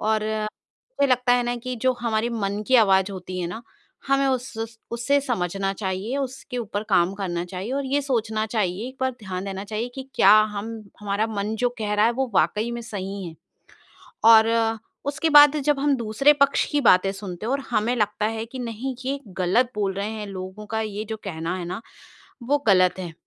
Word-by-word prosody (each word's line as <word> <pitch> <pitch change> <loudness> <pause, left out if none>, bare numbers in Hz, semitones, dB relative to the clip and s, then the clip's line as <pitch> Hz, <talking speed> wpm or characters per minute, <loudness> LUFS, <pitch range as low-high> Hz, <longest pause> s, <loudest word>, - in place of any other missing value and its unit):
और 215 0 +1
मुझे 220 - -3
लगता 250 0 +3
है 245 0 +3
ना 240 0 -1
कि 250 +1 -5
जो 260 0 +4
हमारे 230 0 0
मन 205 -2 -2
की 260 - +6
आवाज 195 -3 +4
होती 185 -1 -6
है 175 - -2
ना, 220 +7 -6 0.4
हमें 275 0 +3
उस 230 -3 -3
उससे 240 +5 +1
समझना 195 - -1
चाहिए, 195 +5 -3
उसके 265 -2 -4
ऊपर 210 -2 -3
काम 175 +3 +3
करना 180 -3 -3
चाहिए 185 +6 -5
और 280 +1 -1
ये 280 +2 +1
सोचना 220 -5 -1
चाहिए, 210 0 -2
एक 260 - -12
बार 260 0 +1
ध्यान 190 -2 -5
देना 195 0 -5
चाहिए 215 +3 -3
कि 265 0 -7
क्या 195 - +7 0.2
हम 220 +3 -4 0.3
हमारा 205 +1 0
मन 210 0 -3
जो 245 +2 +2
कह 210 -1 -1
रहा 210 +1 +4
है, 235 - +2
वो 260 +1 -2
वाक़ई 215 +4 +2
में 235 0 -4
सही 200 -3 -5
है? 165 - -8 0.9
और 225 0 +5 0.3
उसके 285 +3 0
बाद 295 -1 +8
जब 295 -2 +2
हम 285 0 +2
दूसरे 235 +6 +3
पक्ष 280 - +4
की 295 -1 +2
बातें 195 -5 +5
सुनते 195 -1 -7
हैं 235 - -1
और 275 - +1
हमें 230 +1 +1
लगता 210 -2 0
है 225 0 -2
कि 255 +3 -9
नहीं, 245 +2 -4
ये 275 +2 -1 0.2
गलत 210 +8 +2
बोल 200 -2 0
रहे 200 +2 -3
हैं, 215 -1 -5
लोगों 190 +2 -7
का 220 +1 -2
ये 215 -1 -4
जो 220 - -3
कहना 165 -2 -3
है 180 - -5
ना, 180 +5 -5 0.6
वो 285 +4 +2
गलत 185 -2 +4
है। 175 -3 -6
220 Hz, 205 wpm, -24 LUFS, 195-250 Hz, 0.9 s, बाद